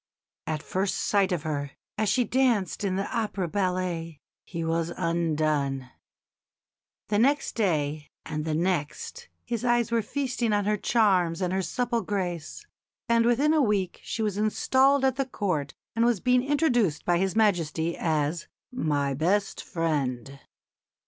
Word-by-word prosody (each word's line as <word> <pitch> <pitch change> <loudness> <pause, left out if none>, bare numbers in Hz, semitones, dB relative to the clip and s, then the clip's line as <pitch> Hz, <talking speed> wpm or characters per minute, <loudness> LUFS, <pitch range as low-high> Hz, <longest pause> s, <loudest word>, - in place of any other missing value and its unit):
At 155 -1 -2
first 190 +1 -1
sight 200 -2 +2
of 170 -4 -1
her, 145 -3 -3 0.2
as 215 -1 0
she 250 +4 +3
danced 235 -5 +1
in 190 -2 0
the 195 +1 -1
opera 210 -5 -1
ballet, 180 -4 -2 0.2
he 165 -2 -5
was 165 +1 0
undone. 155 -6 0 1.2
The 205 0 +2
next 280 +5 +2
day 155 -8 0 0.2
and 150 0 -3
the 155 -1 -1
next 175 - -2 0.2
his 235 -1 -3
eyes 240 -1 +2
were 230 -1 +2
feasting 250 -1 -1
on 205 -1 +1
her 210 +1 +2
charms 190 -6 +2
and 180 -1 -1
her 190 - +1
supple 235 +5 -1
grace; 185 - -4 0.4
and 230 0 +3
within 275 +6 +3
a 310 - +4
week 205 -7 0
she 225 - -3
was 205 -2 -1
installed 265 +5 +3
at 265 -1 +1
the 275 - +1
Court 170 - -2 0.2
and 230 - +2
was 235 -4 +3
being 250 +4 +3
introduced 250 - +1
by 175 -1 +2
His 190 -1 0
Majesty 170 -6 +1
as 155 0 -1 0.2
"my 145 - 0
best 185 +9 0
friend." 140 - -2
190 Hz, 150 wpm, -27 LUFS, 160-230 Hz, 1.2 s, a